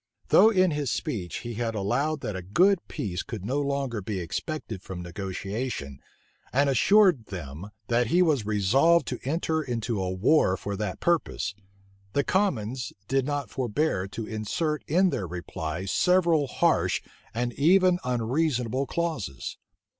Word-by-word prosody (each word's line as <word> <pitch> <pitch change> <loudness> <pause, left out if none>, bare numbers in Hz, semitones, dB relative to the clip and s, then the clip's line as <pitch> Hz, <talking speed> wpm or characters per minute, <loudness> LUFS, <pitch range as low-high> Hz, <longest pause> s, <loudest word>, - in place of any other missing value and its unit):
Though 220 - +7
in 185 -5 +3
his 145 -3 -1
speech 100 -5 -3
he 120 - -4
had 115 0 -2
allowed 135 +10 0
that 105 - -4
a 95 - -4
good 175 - +3
peace 95 -2 -3
could 115 -8 -7
no 135 +6 0
longer 140 -5 -2
be 95 0 -3
expected 110 - -4
from 90 -2 -7
negotiation, 95 - -4 0.5
and 140 +2 +3
assured 180 - +4
them, 85 0 -7 0.2
that 120 +2 +1
he 175 +9 +4
was 150 -9 +2
resolved 110 - +3
to 125 - -4
enter 160 +3 0
into 115 -6 -2
a 95 - -1
war 95 +1 +3
for 100 0 -4
that 105 -2 -4
purpose, 165 - 0 0.6
the 140 - +2
commons 130 - 0
did 135 0 +1
not 145 -1 -2
forbear 125 -5 0
to 110 +3 -6
insert 130 +9 -2
in 180 +4 +3
their 95 - -2
reply 85 0 -5
several 170 - +3
harsh - - +1 0.3
and 120 +1 -2
even 180 +5 +4
unreasonable 125 +1 0
clauses. 140 - -3
125 Hz, 145 wpm, -27 LUFS, 100-155 Hz, 0.6 s, Though